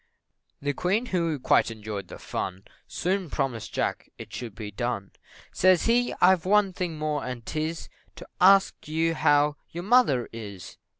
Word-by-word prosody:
The 145 0 0
Queen, 195 - 0
who 170 -8 -1
quite 130 - +3
enjoyed 105 -3 -6
the - - -9
fun, 95 +1 -5 0.2
Soon 185 -1 -2
promised 120 -7 -3
Jack - - -2
it - - -10
should 115 -5 -6
be 110 -2 -7
done, 105 -2 -3 0.4
Says 185 -2 +4
he, 245 +1 +2
"I've 180 -2 +5
one 200 0 +3
thing 175 -3 -3
more, 150 -1 -2
and 125 -3 -6
'tis, 155 +1 -3 0.3
To 170 - -11
ax 195 +1 +6
you 160 +2 0
how 145 -1 +3
your 175 +1 -5
mother 210 - +3
is?" 100 -7 -9
155 Hz, 160 wpm, -26 LUFS, 115-185 Hz, 0.4 s, ax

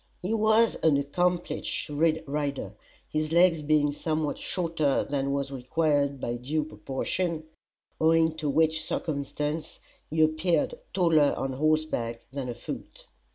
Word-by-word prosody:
He 195 +5 -1
was 220 +1 +3
an 155 -3 +3
accomplished 170 +3 -1
rider, 145 - -1 0.3
his 155 0 -2
legs 170 -1 +5
being 150 -1 +3
somewhat 155 0 -2
shorter 165 -6 0
than 140 -1 -1
was 140 0 -1
required 140 +1 0
by 120 -1 -2
due 150 +6 -1
proportion, 155 - -3 0.6
owing 160 0 +4
to 150 -2 -1
which 160 +2 +2
circumstance 150 0 -3 0.3
he 160 0 +3
appeared 155 - +1 0.2
taller 160 -6 +3
on 135 0 -2
horseback 150 -5 0
than 135 -3 -4
afoot. 120 0 -7
155 Hz, 120 wpm, -27 LUFS, 140-160 Hz, 0.6 s, legs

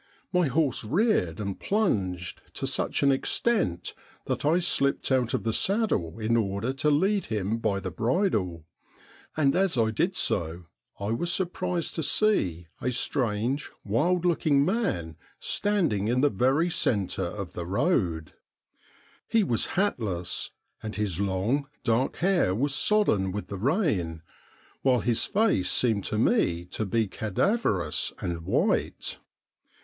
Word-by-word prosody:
My 180 -3 +3
horse 140 -2 +1
reared 140 - +1
and 100 -2 -4
plunged 95 - -1
to - - -3
such - - -1
an 140 - +5
extent 135 - 0 0.3
that - - -2
I 155 +4 +3
slipped 140 -6 +1
out 125 -3 +2
of - - -3
the 115 0 0
saddle 190 - 0
in 115 +1 0
order 110 +3 0
to 150 +3 +1
lead 190 +7 +2
him 110 +1 -2
by 100 -3 0
the - - -5
bridle, 110 - 0 0.7
and 140 -3 +3
as 190 -6 +2
I 110 -1 +2
did 180 - 0
so 85 - 0 0.4
I 100 +2 -2
was 170 +10 0
surprised 175 -1 -1
to 165 - -2
see 95 - +1 0.2
a 125 - 0
strange, 125 +1 0
wild 170 - +1
looking 155 -5 +3
man 130 - -1 0.2
standing 170 - 0
in 125 +2 +2
the 145 - +3
very 135 - +2
centre 100 - 0
of 95 0 -5
the 85 -1 -5
road. 90 - 0 0.9
He 225 -2 +3
was 120 - +1
hatless, 105 - -1 0.3
and 110 -1 -6
his 100 -5 -2
long, 100 +9 0 0.2
dark 115 +4 +1
hair 175 - +2
was 140 +5 0
sodden 135 - +2
with 105 +2 -5
the 100 - -4
rain, 105 - 0 0.6
while 125 -3 +3
his 115 0 +1
face 210 - +1
seemed 110 -5 +2
to 105 - -2
me 90 - +2
to 110 - -3
be 110 +2 +1
cadaverous 110 - 0
and 85 -1 -3
white. - - -1
115 Hz, 145 wpm, -27 LUFS, -, 0.9 s, an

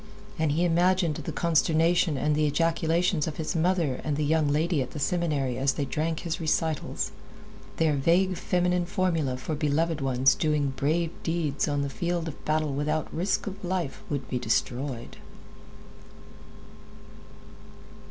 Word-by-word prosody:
And 155 -2 +2
he 170 +3 +2
imagined 175 0 +3
the - - -5
consternation 165 0 +2
and 150 +2 +1
the 155 0 +2
ejaculations 165 +2 +1
of 155 - -5
his 160 0 -3
mother 165 -5 +1
and 150 -2 -1
the 150 - 0
young 155 0 +2
lady 155 +2 +1
at 130 - -5
the 150 - -5
seminary 145 -6 0
as 135 0 +2
they 145 - -2
drank 155 +3 -2
his 170 0 -3
recitals. 160 -1 -1 0.7
Their 160 -2 +3
vague 175 +7 +2
feminine 180 0 0
formula 165 -9 0
for 145 +5 -4
beloved 155 +1 0
ones 135 0 +3
doing 150 -3 0
brave 160 +5 0
deeds 160 -4 -1
on 145 -1 0
the - - -1
field 170 +4 -2
of 155 - -8
battle 155 -2 0
without 150 +2 -1
risk 180 +5 0
of 195 -1 -7
life 175 -5 -2
would 140 -3 -3
be 125 - -2
destroyed. 120 +2 -2
155 Hz, 150 wpm, -27 LUFS, 145-170 Hz, 0.7 s, imagined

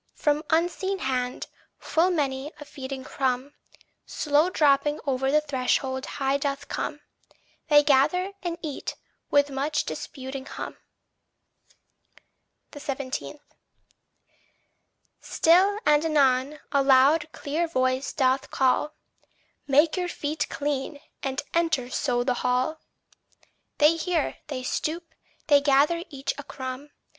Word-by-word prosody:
From 295 0 +1
unseen 355 +4 +1
hand, 255 -5 -2 0.3
full 335 +3 +1
many 285 -4 -1
a 295 - -9
feeding 265 -1 -7
crumb, 260 +1 -2 0.5
Slow 300 +3 +2
dropping 295 -3 +3
o'er 265 -1 0
the 300 +2 +4
threshold 260 -1 -1
high 275 0 +1
doth 280 0 -3
come: - - -4 0.7
They 295 -1 +6
gather 310 +8 +3
and 345 -2 -3
eat, 295 -3 -4 0.3
with 285 0 +3
much 290 +3 -1
disputing 265 -2 -6
hum. - - -6 2.0
17. 280 0 -5 1.8
Still 375 +5 +3
and 300 0 +4
anon, 285 -2 +2
a 280 - +3
loud 280 +4 +4
clear 320 +4 -2
voice 260 -3 0
doth 265 0 +1
call 265 +3 +1 0.7
"Make 295 +5 +4
your 360 -1 -1
feet 295 -2 -3
clean, 290 -1 -3 0.2
and 270 +1 -2
enter 325 -7 +1
so 245 -1 0
the 250 0 +1
hall." 255 +6 0 1.0
They 305 +3 +5
hear, 330 -2 -1
they 265 -4 -5
stoop, 325 +6 -3 0.3
they 285 -2 +5
gather 290 +4 +3
each 275 -3 -3
a - - -6
crumb. 260 +2 -7
285 Hz, 115 wpm, -26 LUFS, 265-310 Hz, 2.0 s, They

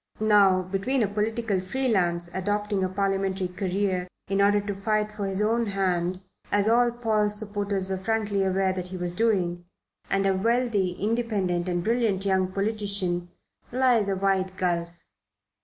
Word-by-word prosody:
Now 200 -3 +5
between 195 +8 0
a - - +1
political 215 0 -1
free 260 +9 -2
lance 175 -6 +1
adopting 205 +1 -1
a 185 - 0
parliamentary 195 -1 -1
career 185 0 -1 0.2
in 195 0 +1
order 205 +1 +4
to 205 0 -3
fight 215 +2 -1
for 205 -2 -4
his 195 +2 -1
own 230 +2 +1
hand, 185 -2 -1 0.3
as 205 0 +2
all 240 +2 +4
Paul's 215 -3 +1
supporters 205 -2 -2
were 190 -1 -3
frankly 205 -1 0
aware 190 0 +1
that 180 -1 -4
he 185 0 -6
was 175 -1 -2
doing, 180 -5 0 0.5
and 195 0 +1
a 195 - +3
wealthy, 220 -2 +1
independent 200 -4 -1
and 175 -1 -1
brilliant 220 -3 +1
young 190 -1 +1
politician 200 -4 0 0.4
lies 245 -5 +3
a 195 - +1
wide 190 -1 0
gulf. 170 -2 0
195 Hz, 155 wpm, -26 LUFS, 185-215 Hz, 0.5 s, Now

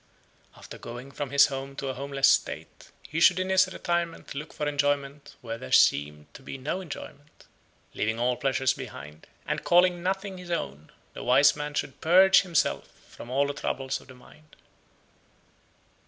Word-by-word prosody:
After - - -12
going 120 +3 -9
from 140 0 -5
his 140 +1 +6
home 135 0 -6
to 135 0 -4
a - - -2
homeless 135 +1 +1
state, - - -1 0.2
he 160 - -3
should 180 +2 +6
in 185 0 -2
his 190 0 +3
retirement 170 -2 -3
look 150 +2 -7
for 150 - -3
enjoyment 145 0 -1
where 115 -1 -6
there 65 - -9
seemed 75 +1 +3
to - - -12
be 135 - -8
no 150 +8 -3
enjoyment. 150 -3 -11 0.5
Leaving 110 +1 -1
all 125 +1 +1
pleasures 135 0 +1
behind, 75 +3 -10 0.2
and - - -3
calling 175 0 +4
nothing 190 +1 -3
his 180 -1 -11
own, 75 - -4 0.2
the - - -8
wise 130 +3 +5
man 150 0 -5
should 135 - -4
purge 190 +4 +6
himself 175 -5 0 0.2
from 120 - -11
all 135 +3 +2
the 140 - -3
troubles 135 -1 -3
of - - -19
the 130 - -13
mind. 150 +4 -19
140 Hz, 170 wpm, -27 LUFS, 130-170 Hz, 0.5 s, his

